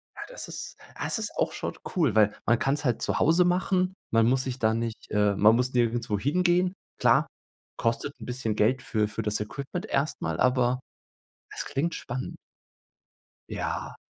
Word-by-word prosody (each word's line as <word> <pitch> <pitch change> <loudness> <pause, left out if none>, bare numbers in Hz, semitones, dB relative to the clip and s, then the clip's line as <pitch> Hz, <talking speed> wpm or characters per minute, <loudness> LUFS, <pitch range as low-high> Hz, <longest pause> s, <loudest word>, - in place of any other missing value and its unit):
Ja, - - -8
das - - -7
ist - - -7 0.2
das - - -1
ist 215 - -3
auch - - +1
schon - - -4 0.2
cool, 145 - +2
weil 105 -1 +5
man 120 +1 +3
kann's 140 +2 0
halt 120 -3 +1
zu - - 0
Hause 165 +3 +4
machen. 185 +1 +1 0.2
Man 115 0 +4
muss 130 +1 +3
sich 130 -1 -4
da 110 0 +3
nicht, 115 0 -4
äh 105 -1 +3
man 110 +3 +6
muss 125 +1 0
nirgendwo 120 -3 +1
hingehen. 180 - +2 0.3
Klar, - - +4 0.5
kostet 115 +5 -1
'n 110 - -8
bisschen 120 -3 -2
Geld 125 +5 +2
für 110 -3 0
für 110 - -4
das 105 0 0
Equipment 140 - -5
erst 140 +3 -1
mal, 80 0 -2
aber 125 0 +3 0.7
es - - -5
klingt 165 +5 -1
spannend. 125 +1 -5 1.1
Ja, - - -3
125 Hz, 175 wpm, -27 LUFS, 110-150 Hz, 1.1 s, man